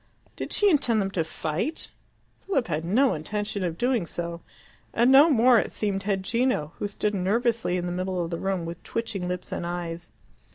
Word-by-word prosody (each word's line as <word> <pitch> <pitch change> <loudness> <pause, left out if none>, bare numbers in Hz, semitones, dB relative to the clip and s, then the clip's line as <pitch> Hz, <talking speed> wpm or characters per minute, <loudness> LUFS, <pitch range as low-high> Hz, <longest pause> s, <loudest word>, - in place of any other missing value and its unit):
Did - - -5
she 415 - +3
intend 260 - +3
them 195 -1 -1
to 170 -4 0
fight? 160 - -3 0.6
Philip 275 -11 +1
had 155 -1 -1
no 245 +10 +3
intention 205 +5 -3
of 170 -2 -2
doing 240 -6 +1
so; 170 0 -5 0.5
and 240 +3 +4
no 285 +5 +8
more, 245 -3 +6
it - - -2
seemed, 200 -2 -2
had 195 -1 -1
Gino, 230 - 0
who 205 - -1
stood 210 +1 -1
nervously 215 +1 +1
in 175 - -2
the 175 - -2
middle 185 0 -2
of 170 - -5
the 170 - -3
room 190 -3 -1
with 170 +1 -7
twitching 220 -6 -3
lips 180 0 -4
and - - -3
eyes. 170 -1 -4
195 Hz, 195 wpm, -26 LUFS, 175-230 Hz, 0.6 s, no